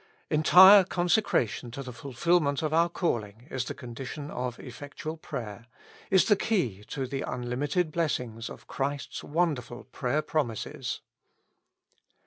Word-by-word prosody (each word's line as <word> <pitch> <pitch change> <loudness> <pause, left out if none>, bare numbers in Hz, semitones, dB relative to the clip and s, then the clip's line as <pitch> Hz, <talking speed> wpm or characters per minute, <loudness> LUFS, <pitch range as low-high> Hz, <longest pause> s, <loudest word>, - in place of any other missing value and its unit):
Entire 190 +6 +8
consecration 175 - +1
to 135 +4 -6
the 125 -1 -8
fulfilment 140 +4 +1
of 155 0 -1
our 170 +1 +4
calling 115 - -2
is 130 -1 -2
the - - -5
condition 135 +3 -7
of 125 -1 -3
effectual 145 +5 -7
prayer, 115 -7 -7 0.4
is 190 -1 +5
the 210 - +5
key 135 - -1
to 135 +3 -4
the 135 +1 -4
unlimited 140 +7 -1
blessings 125 -9 -2
of - - -11
Christ's 140 +1 -3
wonderful 145 -7 -1
prayer 145 +4 -2
promises. 130 -8 -3
140 Hz, 125 wpm, -28 LUFS, 120-165 Hz, 0.4 s, Entire